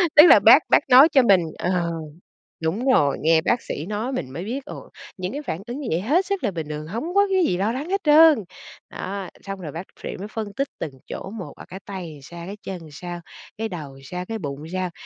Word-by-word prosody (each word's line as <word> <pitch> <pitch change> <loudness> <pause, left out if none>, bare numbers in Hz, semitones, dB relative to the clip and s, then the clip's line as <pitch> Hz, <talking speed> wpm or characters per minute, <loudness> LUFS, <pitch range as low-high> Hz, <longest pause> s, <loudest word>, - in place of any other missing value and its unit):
Tức 300 - +10
là - - +9
bác - - +7
bác - - +3
nói 265 +6 +9
cho 270 - +5
mình 195 -6 +5 0.2
ờ, 175 -1 0 0.7
đúng 215 +12 0
rồi, 145 - +3
nghe 160 +1 +4
bác 240 +8 0
sĩ 155 - -5
nói 215 +6 -3
mình 145 - -4
mới 165 +7 -6
biết, 265 +6 -4
ồ, - - -10 0.3
những 185 +1 -4
cái 295 - -5
phản 185 - -4
ứng 245 +4 -5
như 270 - -5
vậy 165 - +1
hết 305 - +1
sức 395 -7 -2
là 210 - +2
bình 160 -5 -5
thường, 150 0 -5
hông 235 - -4
có 405 0 +5
cái 375 -2 +3
gì 180 - +1
lo 205 +4 0
lắng 285 +8 -5
hết 395 - +1
trơn. 305 -1 +7 0.5
Đó, 195 -1 -5
xong 195 -1 -6
rồi 155 -4 -6
bác 170 +4 -6 0.2
phệ - - -5
mới 200 +3 -7
phân 215 -2 -5
tích 275 0 -1
từng 145 - -4
chỗ 190 - -7
một, 205 -4 -7
ở - - -11
cái 190 - -9
tay 190 -2 -6
thì 145 - -13
sao, 170 +4 -9
cái 200 +2 -7
chân 185 -3 -6
sao, 175 +2 -7 0.4
cái 225 0 -2
đầu 145 -7 -8
sao, 180 +5 -5
cái 225 0 -3
bụng 145 -3 -6
sao, 185 -1 -2
195 Hz, 245 wpm, -23 LUFS, 170-255 Hz, 0.7 s, Tức